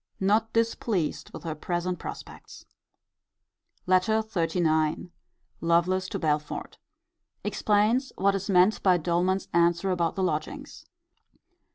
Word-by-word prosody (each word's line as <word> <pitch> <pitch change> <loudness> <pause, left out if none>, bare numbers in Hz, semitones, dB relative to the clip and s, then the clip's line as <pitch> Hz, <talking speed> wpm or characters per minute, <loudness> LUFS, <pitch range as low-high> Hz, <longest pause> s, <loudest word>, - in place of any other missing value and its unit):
Not 215 +3 +2
displeased 225 -7 -1
with - - -9
her 165 -2 -3
present 175 +3 -3
prospects. - - -9 1.2
LETTER 185 +4 +2
XXXIX. 165 -4 0 0.5
Lovelace 180 +3 +1
to - - -3
Belford. 150 -2 -2 0.6
Explains 220 +6 +1
what 195 +1 +3
is 195 +1 -3
meant 185 +3 +4
by 185 -2 +4
Doleman's 175 +3 0
answer 170 +2 +2
about 170 -2 0
the 190 - -1
lodgings. 155 -4 -4
180 Hz, 105 wpm, -27 LUFS, 170-200 Hz, 1.2 s, meant